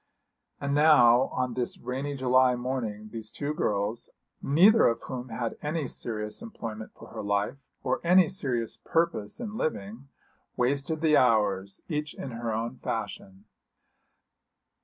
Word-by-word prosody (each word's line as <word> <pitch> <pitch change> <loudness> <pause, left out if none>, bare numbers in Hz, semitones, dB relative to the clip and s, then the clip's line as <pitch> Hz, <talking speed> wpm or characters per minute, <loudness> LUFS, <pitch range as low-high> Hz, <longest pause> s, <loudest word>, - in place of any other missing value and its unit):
And 140 0 -2
now 135 -5 +6
on 125 -1 -2
this 125 0 -2
rainy 135 +3 -4
July 130 -1 +4
morning 120 -4 -4
these 110 -1 -5
two 145 +5 -3
girls, 105 -4 -1 0.3
neither 195 +11 +6
of 115 - +1
whom 125 -1 -6
had 115 0 -4
any 150 -1 -2
serious 105 - -4
employment 115 - -7
for - - -13
her - - -6
life, 100 +5 -1 0.3
or - - 0
any 180 0 +6
serious 125 - -2
purpose 165 - 0
in 220 -3 -5
living, 115 - -3 0.5
wasted 140 +5 +1
the 155 -2 +5
hours, 105 -5 +2
each 150 -2 -3
in 135 - -6
her 115 0 -3
own 115 +2 -3
fashion. 95 +1 -5
125 Hz, 140 wpm, -28 LUFS, 110-150 Hz, 0.5 s, now